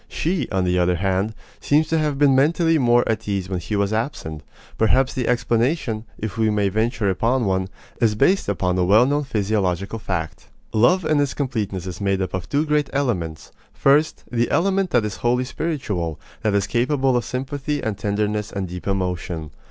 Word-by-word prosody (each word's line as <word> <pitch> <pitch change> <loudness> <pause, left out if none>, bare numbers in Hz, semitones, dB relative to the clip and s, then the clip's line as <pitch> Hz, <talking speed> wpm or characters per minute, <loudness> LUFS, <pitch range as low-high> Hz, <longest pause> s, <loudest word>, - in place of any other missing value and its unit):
She, 165 -4 -2
on 95 -2 0
the 90 0 +1
other 90 0 +2
hand, 95 +4 -1 0.2
seems 150 +2 +2
to 160 - +2
have 150 -2 0
been 140 -1 +5
mentally 165 +3 +3
more 120 -1 +3
at 110 - -2
ease 95 -2 -2
when 95 -2 -2
he 105 +5 -4
was 100 +1 0
absent. 110 - -3 0.4
Perhaps 130 +4 +3
the 125 -3 -2
explanation, 120 -1 0
if 110 +1 -5
we 110 -1 +3
may 105 -2 +1
venture 110 +1 0
upon 115 +6 +1
one, 95 -1 0 0.3
is 110 -3 +3
based 185 - +2
upon 90 -1 0
a - - +3
well 105 +7 +5
known 145 +2 0
physiological 100 -3 -1
fact. 80 - -4 0.3
Love 170 - +3
in 155 -1 +2
its 145 -2 0
completeness 105 - -2
is 90 0 -6
made 100 -1 +1
up 95 - -3
of 95 - -4
two 145 +2 +1
great 150 -2 +1
elements 90 - -2 0.2
first, 145 +3 +2
the 120 -1 +1
element 195 +1 +1
that 120 -8 +2
is 105 -2 -4
wholly 125 +1 +1
spiritual, 120 - -3 0.2
that 110 -2 +1
is 100 -1 +2
capable 130 +2 +1
of 120 - +1
sympathy, 140 +3 -3
and 110 -3 -3
tenderness, 105 0 -1
and 100 -2 -3
deep 90 +2 -7
emotion. 90 -4 -2
110 Hz, 190 wpm, -22 LUFS, 95-135 Hz, 0.4 s, been